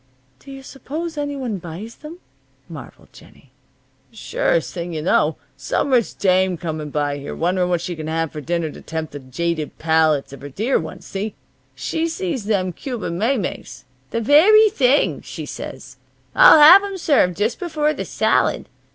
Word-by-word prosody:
"Do 275 - -13
you 270 0 -10
suppose 310 +5 -6
any 290 -1 -3
one 245 -8 -4
buys 175 +7 -9
them?" 310 +3 -10 0.5
marveled - - -12
Jennie. - - -18 0.6
"Surest - - -1
thing 175 -1 -5
you 155 -1 -4
know. 155 -2 +2 0.2
Some 280 - -2
rich 240 -4 +1
dame 185 -1 +2
coming 155 -3 -5
by 145 -1 -2
here, 140 - -7
wondering 180 +1 0
what 175 -2 0
she 175 0 -5
can 155 -1 -7
have 160 0 -2
for 155 - -7
dinner 165 +1 -2
to - - -12
tempt 160 -1 -5
the 145 - -6
jaded 155 +4 -4
palates 160 -3 +1
of 140 - -11
her 145 - -8
dear 220 - 0
ones, - - -8
see? 200 +2 -5 0.4
She 325 0 -2
sees 330 - -4
them 190 -4 0
Cuban 220 - -5
maymeys. 225 -3 -2 0.3
'The 230 - -2
very 405 - +6
thing!' 275 -6 +2
she - - -8
says. - - -9 0.4
'I'll - - +8
have 335 +7 +9
'em 400 -1 -5
served 275 - +2
just 215 +4 -1
before 305 -3 -1
the - - -5
salad.' - - 0
200 Hz, 170 wpm, -20 LUFS, -, 0.6 s, have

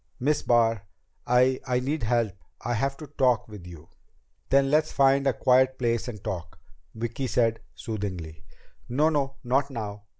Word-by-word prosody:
"Miss 145 +4 +1
Barr 115 -4 +2 0.4
I 125 +1 +3
I 125 -1 +1
need 145 +5 -2
help. 115 -2 +1 0.3
I 120 - -2
have 135 +4 -1
to 155 - -8
talk 130 -4 +1
with 105 -5 -11
you." 80 -3 -12 0.6
"Then 135 +1 +3
let's 155 +1 +3
find 135 0 +3
a 135 - +3
quiet 130 +2 +3
place 115 -1 0
and 105 -5 -7
talk," 85 -4 -5 0.4
Vicki 120 +4 -3
said 115 -2 +1 0.2
soothingly. 90 -8 -5 0.5
"No, 145 +6 +3
no. 140 -3 -1
Not 135 +3 +1
now." 105 -5 -6
125 Hz, 160 wpm, -26 LUFS, 110-135 Hz, 0.6 s, I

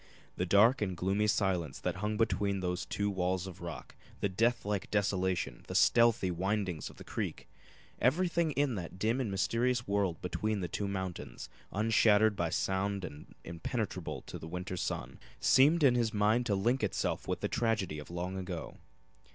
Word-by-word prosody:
The 90 - -1
dark 110 +8 +5
and 95 -4 -1
gloomy 100 +4 +1
silence 90 -9 0
that 90 0 -2
hung 105 +2 -2
between 100 -3 +1
those 90 0 -2
two 100 - -1
walls 95 -1 0
of 90 -2 -9
rock, 80 -7 -7 0.3
the 100 - 0
death 115 +5 +1
like 100 -2 -2
desolation, 95 - 0
the - - -5
stealthy 115 -5 +4
windings 95 -2 -2
of - - -14
the - - -11
creek - - -4 0.5
everything 170 +5 +2
in 140 -2 +1
that 90 -3 -6
dim 115 +7 +1
and 120 - -1
mysterious 120 +5 0
world 100 -4 0
between 105 +4 -2
the 90 - -2
two 100 +3 -3
mountains, 95 -2 -5 0.2
unshattered 110 0 +4
by 85 -3 0
sound 95 +2 -1
and 75 -1 -11
impenetrable 90 +2 -4
to - - -8
the - - -8
winter 90 +2 -4
sun, 90 - -4 0.2
seemed 150 +5 +5
in 135 -3 +6
his 120 -2 +1
mind 110 +4 +2
to 100 - +2
link 120 +6 +1
itself 105 - -1
with - - -2
the - - 0
tragedy 110 -9 0
of 75 - -10
long 90 +2 -4
ago. 90 -3 -6
100 Hz, 175 wpm, -32 LUFS, 90-110 Hz, 0.5 s, in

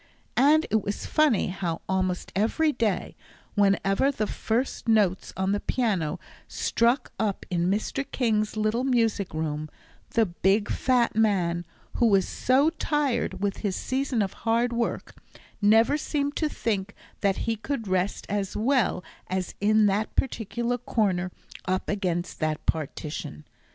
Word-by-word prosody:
And 295 +5 +5
it 220 0 +3
was 200 +1 -4
funny 300 -12 +2
how, 175 -3 -3
almost 185 -1 -1
every 265 +10 +2
day, 220 -8 -1 0.4
whenever 200 +5 +3
the 220 -6 -1
first 235 +4 -2
notes 205 -5 +2
on 190 +1 +1
the 205 - +1
piano 205 -13 -1 0.3
struck 235 +4 +1
up 210 -3 -1
in 175 0 +1
Mr. 215 +7 -1
King's 215 -4 0
little 215 +3 +1
music 225 -7 +1
room, 155 -1 -3 0.5
the 225 - +5
big 195 +3 +1
fat 250 -4 +2
man, 175 -6 +1 0.3
who 235 - +4
was 195 -3 +3
so 275 +5 +2
tired 280 - -1
with 200 -1 -1
his 200 -3 -2
season 260 -4 0
of 190 - -4
hard 235 +2 +1
work, 235 0 -2 0.5
never 225 +7 +5
seemed 285 -1 -1
to 310 - +1
think 205 -7 -2 0.2
that 195 -2 +1
he 230 - 0
could 225 0 -4
rest 185 +1 0
as 200 -2 -2
well 235 -5 +1 0.2
as 185 0 -2
in 215 +1 +4
that 205 +2 0
particular 235 0 -1
corner 190 -6 0 0.3
up 185 0 -1
against 180 -4 -2
that 155 -1 -2
partition. 150 - -4
210 Hz, 140 wpm, -26 LUFS, 190-240 Hz, 0.5 s, And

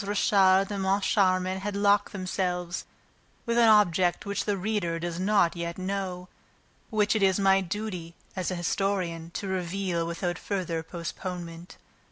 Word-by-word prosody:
Richard 195 -1 +3
and 200 -1 -2
Moncharmin 190 -1 +2
had 200 +1 -4
locked 205 0 +3
themselves 180 -2 -2 0.6
with 235 -1 0
an 230 - +6
object 185 -4 +3
which 200 0 -2
the 205 -1 0
reader 190 -4 -1
does 170 0 -4
not 190 -3 +3
yet 170 0 -4
know, 185 -1 -3 0.6
but 220 - -7
which 210 +1 +3
it 215 - +1
is 190 0 +3
my 195 0 +4
duty, 180 -3 -5 0.2
as 185 -2 -2
an 185 - -3
historian, 175 -2 -1
to 200 - -3
reveal 180 -2 -2
without 175 +1 -3
further 180 -5 -2
postponement. 170 +1 -7
185 Hz, 150 wpm, -27 LUFS, 175-200 Hz, 0.6 s, an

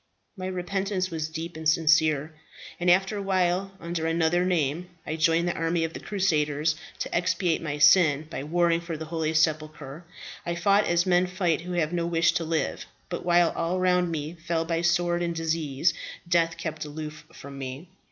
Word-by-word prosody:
"My 185 -2 -5
repentance 185 +1 -2
was 160 -1 -3
deep 165 +1 -6
and 160 -1 0
sincere; 155 -1 +3 0.5
and 175 0 +1
after 195 +4 +3
a - - -3
while, 190 0 0
under 170 -1 -3
another 165 +1 +2
name, 175 -1 0 0.2
I 155 - -3
joined 165 +2 +2
the 175 - 0
army 165 0 0
of 165 0 -3
the - - -6
crusaders, 155 -6 0 0.3
to - - -3
expiate 175 -1 +1
my 150 -2 -3
sin 150 -1 +5
by 145 - -5
warring 170 +2 +2
for 170 -2 -5
the 160 - -6
holy 160 -1 -2
sepulchre. 155 -1 -1 0.4
I 170 - -2
fought 200 +4 +3
as 175 +1 +2
men 180 0 +3
fight 180 -3 0
who 180 +1 -6
have 170 -1 0
no 170 -1 0
wish 165 0 +3
to 170 - -1
live; 160 -2 -2 0.2
but - - -4
while 175 -1 +4
all 170 +2 -1
around 180 -1 +2
me 155 -1 -4
fell 165 -1 -2
by 165 0 -1
sword 175 0 +1
and 170 -1 -1
disease, 160 0 0 0.3
death 165 -1 +2
kept 160 -2 -4
aloof 155 0 -7
from 140 0 -10
me. 135 +5 -6
165 Hz, 185 wpm, -26 LUFS, 155-175 Hz, 0.5 s, sin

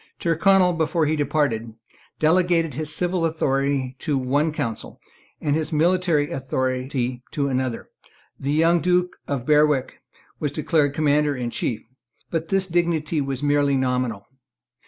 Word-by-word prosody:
Tyrconnel, 180 +2 +3
before 160 0 0
he 155 +1 +1
departed, 130 -7 -1 0.4
delegated 165 -1 +2
his 155 +3 -3
civil 175 +2 0
authority 135 -4 0
to 150 -4 -1
one 140 +5 +1
council, 135 -7 -5 0.4
and 145 -1 0
his 160 +1 -1
military 165 -1 +2
authority 130 -2 -2
to 140 -2 -1
another. 130 -2 -2 0.5
The 140 - -2
young 165 +3 +3
Duke 180 0 +1
of 135 -4 -3
Berwick 150 -2 +2 0.4
was 150 - -1
declared 150 -1 +1
Commander 150 -1 +2
in 120 -2 -3
Chief; 115 -2 -3 0.5
but 165 -1 -2
this 195 +1 +1
dignity 170 -3 0
was 135 0 -3
merely 145 -1 +2
nominal. 125 -5 -1
150 Hz, 135 wpm, -23 LUFS, 135-165 Hz, 0.5 s, Tyrconnel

